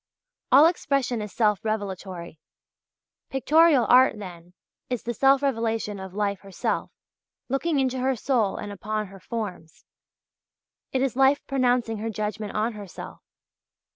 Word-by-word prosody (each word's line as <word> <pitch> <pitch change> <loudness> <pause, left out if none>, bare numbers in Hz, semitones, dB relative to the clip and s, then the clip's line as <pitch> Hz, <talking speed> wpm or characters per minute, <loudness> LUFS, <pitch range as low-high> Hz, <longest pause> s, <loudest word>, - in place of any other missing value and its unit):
All 280 +4 +8
expression 275 -8 0
is 210 -1 -6
self 210 -3 +1
revelatory. 190 -6 -4 0.9
Pictorial 295 0 +4
art, 255 -2 +6
then, 180 -3 -10 0.3
is 250 -3 -3
the 240 - -3
self 270 +3 +4
revelation 225 -5 -1
of 190 0 -9
life 200 -2 -1
herself 195 -1 -3 0.6
looking 280 +3 0
into 260 -1 0
her 260 +1 +1
soul 230 -4 0
and 205 - -6
upon 215 +2 -3
her 195 0 -13
forms. 200 -8 -6 1.1
It 260 0 +1
is 270 -3 -1
life 270 +2 +3
pronouncing 245 -4 +1
her 225 +2 -3
judgment 215 -1 -4
on 220 +2 0
herself. 205 -4 -9
225 Hz, 135 wpm, -25 LUFS, 205-265 Hz, 1.1 s, All